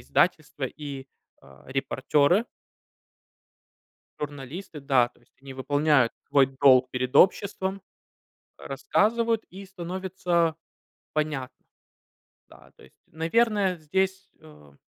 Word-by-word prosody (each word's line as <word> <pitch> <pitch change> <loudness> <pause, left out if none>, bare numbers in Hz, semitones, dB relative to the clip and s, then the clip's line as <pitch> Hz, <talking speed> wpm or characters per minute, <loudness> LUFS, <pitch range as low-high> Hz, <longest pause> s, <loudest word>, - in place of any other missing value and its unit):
издательства 150 - 0
и, 140 0 -7 0.3
а, 70 0 -18
репортеры. 140 - +1 1.8
Журналисты, 145 +3 -7
да, 130 -3 +3
то - - -27
есть 120 - -31
они 135 -1 -10
выполняют 145 -1 +2 0.2
свой 140 -2 +5
долг 130 -2 +6
перед 130 0 -3
обществом, 190 0 +3 0.8
рассказывают 230 - 0
и 195 +2 -10
становится 180 -3 -1 0.6
понятно. 150 -4 -3 0.8
Да, - - -18
то - - -18
есть, - - -20
наверное, 195 +3 +1
здесь, 190 +5 -2
эм 75 -2 -17
155 Hz, 95 wpm, -26 LUFS, 135-190 Hz, 1.8 s, долг